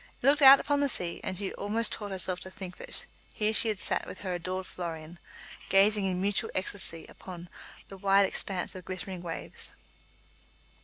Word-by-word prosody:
It - - -6
looked 290 +2 +5
out 275 0 +10
upon 290 0 +1
the 285 -1 +2
sea, 175 -8 +1
and 185 - -3
she 200 - -2
had - - -8
almost 220 +3 +1
taught 205 -1 -4
herself 185 -1 -3
to 185 - -5
think 185 -1 -8
that - - -2 0.3
here 215 0 +1
she 225 - +4
had 215 -2 0
sat - - -1
with - - -8
her 185 -2 -3
adored 185 +2 -3
Florian, 170 -1 -6 0.5
gazing 200 +1 +5
in 185 -1 0
mutual 200 +1 0
ecstasy 185 -3 -1
upon 175 -2 -10 0.4
the 195 - -10
"wide 195 +1 +4
expanse 190 -1 -2
of 185 - -8
glittering 185 -1 -5
waves." 170 -2 -6
190 Hz, 190 wpm, -29 LUFS, 180-205 Hz, 0.5 s, out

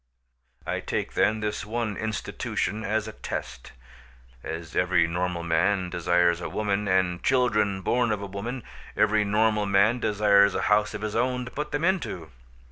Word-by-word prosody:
I - - -2
take, - - -3
then, 110 0 +2
this 105 0 -2
one 110 0 -3
institution 110 -1 -3
as 110 0 -1
a - - -5
test. 65 - -6 0.7
As 80 0 -6
every 90 -1 +3
normal 90 +1 -2
man 90 +3 +1
desires 85 0 +2
a - - -4
woman, 105 -1 -1
and 95 -2 +1
children 105 -7 +1
born 120 +3 +1
of 105 - -1
a 100 - -5
woman, 110 +6 -5 0.3
every 105 0 +3
normal 105 0 +1
man 100 +5 +3
desires 100 -3 +4
a - - 0
house 105 0 +2
of 105 - -6
his 105 -1 -3
own 125 +1 0
to 125 - -9
put 150 +1 -4
them 145 +2 -2
into. 130 - -1
105 Hz, 165 wpm, -26 LUFS, 90-110 Hz, 0.7 s, desires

